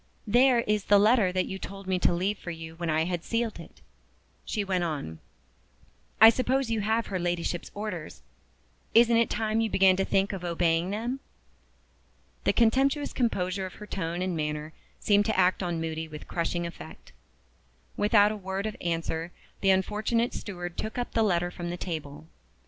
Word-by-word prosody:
"There 245 Hz, +2 st, +4 dB
is 210 Hz, -3 st, -1 dB
the 205 Hz, -, +6 dB
letter 210 Hz, -2 st, +4 dB
that 185 Hz, 0 st, 0 dB
you 190 Hz, -, -6 dB
told 195 Hz, 0 st, -8 dB
me 185 Hz, -1 st, 0 dB
to -, -, +3 dB
leave 190 Hz, +4 st, -1 dB
for -, -, -7 dB
you 160 Hz, -1 st, -7 dB
when 170 Hz, -1 st, -3 dB
I 155 Hz, 0 st, +2 dB
had 175 Hz, -1 st, -3 dB
sealed 230 Hz, -4 st, -2 dB
it," 165 Hz, -, -13 dB, 0.6 s
she 210 Hz, -, -2 dB
went 185 Hz, -2 st, 0 dB
on. 140 Hz, -, -4 dB, 1.0 s
"I 220 Hz, +1 st, +10 dB
suppose 255 Hz, 0 st, 0 dB
you 225 Hz, -2 st, 0 dB
have 220 Hz, +2 st, +1 dB
her 190 Hz, -2 st, -3 dB
Ladyship's 175 Hz, 0 st, -2 dB
orders. 200 Hz, -7 st, -6 dB, 0.7 s
Isn't 235 Hz, 0 st, +6 dB
it 230 Hz, -1 st, +3 dB
time 220 Hz, 0 st, 0 dB
you 225 Hz, -, 0 dB
began 190 Hz, -2 st, +5 dB
to 195 Hz, -, +2 dB
think 195 Hz, +1 st, +1 dB
of 190 Hz, -2 st, -5 dB
obeying 170 Hz, 0 st, +1 dB
them?" 235 Hz, +6 st, -3 dB, 1.3 s
The -, -, +4 dB
contemptuous 270 Hz, +5 st, +2 dB
composure 190 Hz, -5 st, -1 dB
of 185 Hz, -, -12 dB
her 210 Hz, -, -9 dB
tone 175 Hz, -3 st, -3 dB
and 185 Hz, -2 st, -2 dB
manner 150 Hz, 0 st, -3 dB, 0.3 s
seemed 205 Hz, 0 st, +3 dB
to 220 Hz, -, 0 dB
act 185 Hz, 0 st, +3 dB
on 175 Hz, -3 st, -2 dB
Moody 160 Hz, 0 st, -3 dB
with 150 Hz, -1 st, -10 dB
crushing 170 Hz, 0 st, -2 dB
effect. 170 Hz, -, -10 dB, 0.8 s
Without 205 Hz, 0 st, +4 dB
a -, -, -3 dB
word 190 Hz, 0 st, -4 dB
of 215 Hz, -, -3 dB
answer, 165 Hz, 0 st, -2 dB, 0.3 s
the 195 Hz, -, +2 dB
unfortunate 215 Hz, +5 st, +1 dB
steward 175 Hz, -4 st, -6 dB
took 220 Hz, +2 st, -4 dB
up 245 Hz, -, -3 dB
the 225 Hz, -, +1 dB
letter 175 Hz, -4 st, +1 dB
from 175 Hz, -1 st, -6 dB
the 175 Hz, -, -4 dB
table. 155 Hz, -4 st, -6 dB
190 Hz, 180 wpm, -28 LUFS, 170-220 Hz, 1.3 s, I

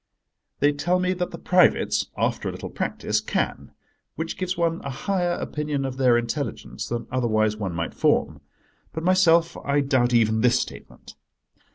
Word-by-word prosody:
They 145 Hz, +1 st, +5 dB
tell 170 Hz, +5 st, 0 dB
me 185 Hz, 0 st, +1 dB
that 180 Hz, -1 st, -2 dB
the -, -, -8 dB
privates, 180 Hz, -1 st, +3 dB
after -, -, -1 dB
a -, -, -3 dB
little -, -, -7 dB
practice, -, -, -1 dB
can—which 165 Hz, +1 st, -5 dB
gives 185 Hz, 0 st, -3 dB
one 170 Hz, -1 st, 0 dB
a 140 Hz, -, -4 dB
higher 175 Hz, +5 st, -1 dB
opinion 150 Hz, -4 st, -3 dB
of 130 Hz, -1 st, -4 dB
their 125 Hz, -3 st, +4 dB
intelligence 120 Hz, -1 st, -4 dB
than 120 Hz, 0 st, -3 dB
otherwise 110 Hz, -4 st, +1 dB
one 95 Hz, -5 st, -4 dB
might 85 Hz, 0 st, -3 dB
form. -, -, +1 dB, 0.5 s
But 160 Hz, -, -4 dB
myself 170 Hz, -2 st, +4 dB
I 145 Hz, 0 st, 0 dB
doubt 130 Hz, -3 st, +2 dB
even 110 Hz, -2 st, +3 dB
this 125 Hz, +1 st, +4 dB
statement. -, -, -8 dB
140 Hz, 160 wpm, -24 LUFS, 120-175 Hz, 0.5 s, They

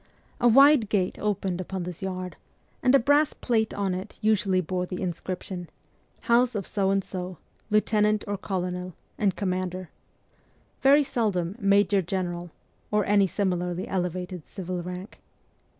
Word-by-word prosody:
A 245 Hz, -, +4 dB
wide 275 Hz, -2 st, +6 dB
gate 190 Hz, -4 st, 0 dB
opened 195 Hz, -3 st, -1 dB
upon 185 Hz, 0 st, -4 dB
this 175 Hz, -1 st, -7 dB
yard, 185 Hz, -1 st, -4 dB, 0.5 s
and 255 Hz, +1 st, +5 dB
a -, -, +9 dB
brass 290 Hz, +4 st, +3 dB
plate 220 Hz, -3 st, 0 dB
on 195 Hz, -2 st, -1 dB
it 185 Hz, +1 st, -6 dB
usually 210 Hz, -3 st, +2 dB
bore 180 Hz, +1 st, -2 dB
the 180 Hz, -, -5 dB
inscription, 180 Hz, 0 st, -5 dB, 0.3 s
' -, -, -37 dB
House 240 Hz, 0 st, +4 dB
of 200 Hz, -3 st, -2 dB
So 195 Hz, -2 st, 0 dB
and 195 Hz, 0 st, +2 dB
So, 180 Hz, -2 st, -6 dB, 0.3 s
Lieutenant 210 Hz, 0 st, +2 dB
or 205 Hz, -, -1 dB
Colonel, 180 Hz, -2 st, -3 dB, 0.2 s
and 200 Hz, -3 st, +2 dB
Commander 185 Hz, -2 st, -3 dB, 0.5 s
' -, -, -37 dB
very 280 Hz, +2 st, +6 dB
seldom 200 Hz, -9 st, -1 dB
' -, -, -21 dB
Major 200 Hz, -1 st, +3 dB
General 175 Hz, -1 st, -3 dB, 0.2 s
' -, -, -40 dB
or 210 Hz, -2 st, +2 dB
any 200 Hz, -1 st, +4 dB
similarly 180 Hz, -2 st, -1 dB
ele 180 Hz, -2 st, 0 dB
vated 180 Hz, -1 st, -7 dB
civil 180 Hz, -2 st, -5 dB
rank. 180 Hz, +3 st, -7 dB
190 Hz, 160 wpm, -26 LUFS, 180-210 Hz, 0.5 s, a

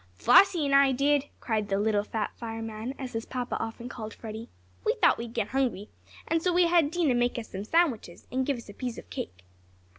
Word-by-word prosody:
"Flossie 315 Hz, -, +5 dB
and 280 Hz, -, 0 dB
I 275 Hz, -1 st, +6 dB
did!" 285 Hz, +2 st, +2 dB
cried 215 Hz, -3 st, -1 dB
"the 195 Hz, -, +1 dB
little 210 Hz, -1 st, +2 dB
fat 215 Hz, 0 st, -3 dB
fireman," 225 Hz, +1 st, -5 dB
as 260 Hz, -2 st, -6 dB
his 225 Hz, 0 st, -4 dB
papa 250 Hz, -1 st, -3 dB
often 225 Hz, +2 st, -5 dB
called 220 Hz, -4 st, -7 dB
Freddie. 220 Hz, +1 st, -8 dB, 0.3 s
"We -, -, +1 dB
thought -, -, +4 dB
we'd 235 Hz, 0 st, -7 dB
get 220 Hz, -3 st, -1 dB
hungry, 245 Hz, -6 st, -1 dB, 0.5 s
so 360 Hz, +2 st, +1 dB
we 355 Hz, 0 st, +4 dB
had 335 Hz, -3 st, +4 dB
Dinah 325 Hz, -5 st, +1 dB
make 245 Hz, 0 st, +1 dB
us 230 Hz, -, -6 dB
some 195 Hz, +1 st, -5 dB
sandwiches, 255 Hz, -, 0 dB
and 260 Hz, +1 st, 0 dB
give 275 Hz, -1 st, -1 dB
us 235 Hz, -, -11 dB
a 205 Hz, -, -10 dB
piece 245 Hz, +1 st, -5 dB
of -, -, -10 dB
cake." 90 Hz, 0 st, -6 dB
240 Hz, 210 wpm, -28 LUFS, 220-275 Hz, 0.5 s, I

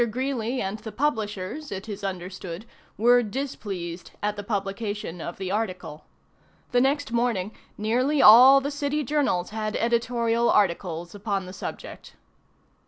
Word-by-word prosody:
Greeley 255 Hz, 0 st, -2 dB
and 195 Hz, +3 st, -4 dB
the 220 Hz, +1 st, -8 dB
publishers, 220 Hz, 0 st, -2 dB
it 195 Hz, +2 st, -6 dB
is 205 Hz, -2 st, -6 dB
understood, 185 Hz, 0 st, -5 dB, 0.3 s
were 245 Hz, +3 st, +5 dB
displeased 200 Hz, -8 st, -5 dB
at 210 Hz, 0 st, 0 dB
the 205 Hz, -, -5 dB
publication 200 Hz, -3 st, -3 dB
of 170 Hz, -, -6 dB
the 190 Hz, -1 st, -4 dB
article. 185 Hz, -7 st, -3 dB, 0.7 s
The 245 Hz, -1 st, +3 dB
next 280 Hz, 0 st, +1 dB
morning 230 Hz, -5 st, 0 dB, 0.3 s
nearly 250 Hz, +7 st, +1 dB
all 255 Hz, +5 st, +9 dB
the 285 Hz, +2 st, -3 dB
city 290 Hz, +1 st, -1 dB
journals 265 Hz, -11 st, 0 dB
had 215 Hz, -1 st, -3 dB
editorial 235 Hz, 0 st, +1 dB
articles 175 Hz, -3 st, +1 dB
upon 200 Hz, -2 st, -2 dB
the 185 Hz, -, -9 dB
subject. -, -, -8 dB
215 Hz, 135 wpm, -25 LUFS, 190-245 Hz, 0.7 s, all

